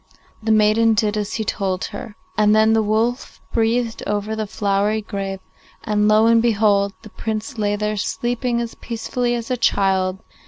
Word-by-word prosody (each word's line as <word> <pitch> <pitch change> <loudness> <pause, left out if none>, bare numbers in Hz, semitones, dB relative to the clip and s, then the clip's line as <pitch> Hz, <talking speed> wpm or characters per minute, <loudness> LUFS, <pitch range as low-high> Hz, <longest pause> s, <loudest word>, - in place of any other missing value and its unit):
The 220 0 0
maiden 220 +1 +4
did 210 -1 +1
as 210 -1 -3
he 220 - -1
told 190 -3 -2
her, 210 +1 -7 0.2
and 210 0 +4
then 220 +1 +4
the 225 - +3
wolf 220 +4 -1
breathed 230 0 0
over 210 +1 -2
the 215 -1 -3
flowery 205 +1 0
grave, 195 -2 -4 0.4
and, 210 0 +1
lo 215 +1 +5
and 230 0 +5
behold! 205 -3 +2
the 215 - -12
Prince 220 +3 -4
lay 205 -1 +1
there 210 0 -2
sleeping 240 +4 -1
as 235 -1 -4
peacefully 240 +1 -2
as 235 +1 -5
a 250 - +1
child. 190 -4 +1
215 Hz, 170 wpm, -21 LUFS, 205-230 Hz, 0.4 s, lo